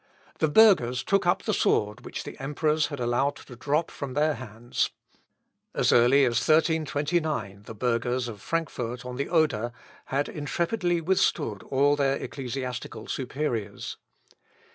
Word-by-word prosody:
The 160 - +3
burghers 150 - +5
took 195 -2 +1
up 175 - +2
the - - 0
sword 105 0 +1
which - - -5
the - - -8
emperors 150 +2 +1
had 145 -2 -6
allowed 125 +4 +1
to 125 - -12
drop 150 +6 0
from 135 -2 -6
their 155 +1 +3
hands. 120 -2 -3 0.9
As - - +3
early 130 +4 +6
as 120 -2 +2
1329 155 - +1
the 115 - -8
burghers 120 +2 0
of 105 -4 -8
Frankfort 125 -7 -3
on 125 0 -5
the 140 - -2
Oder 145 -9 +2 0.3
had 140 +2 -1
intrepidly 175 +4 -1
withstood 155 - +1
all 140 +2 +3
their 140 -1 +2
ecclesiastical 125 -4 -5
superiors. 125 -6 -3
140 Hz, 140 wpm, -27 LUFS, 120-155 Hz, 0.9 s, early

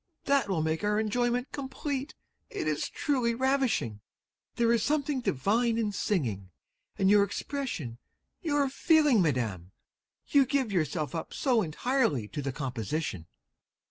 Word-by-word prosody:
That 275 -7 +2
will 170 -5 +1
make 160 +3 -1
our 210 +1 +2
enjoyment 240 +3 0
complete; 275 +1 -4 0.3
it - - -3
is - - -1
truly 250 -6 0
ravishing! 255 - 0 0.5
There 235 0 +3
is 230 - +2
something 290 0 0
divine 225 - +1
in 220 -2 0
singing, 120 - -1 0.5
and 190 - +2
your 205 +1 +6
expression, 200 - -4 0.4
your 290 -4 +1
feeling, 295 - +4
Madam! 110 - -1 0.5
You 275 -2 +4
give 265 -4 0
yourself 155 -3 -1
up 165 - -5
so 250 -5 +2
entirely 175 - 0
to 145 - -4
the 135 -1 -2
composition! 125 - -3
215 Hz, 135 wpm, -29 LUFS, -, 0.5 s, your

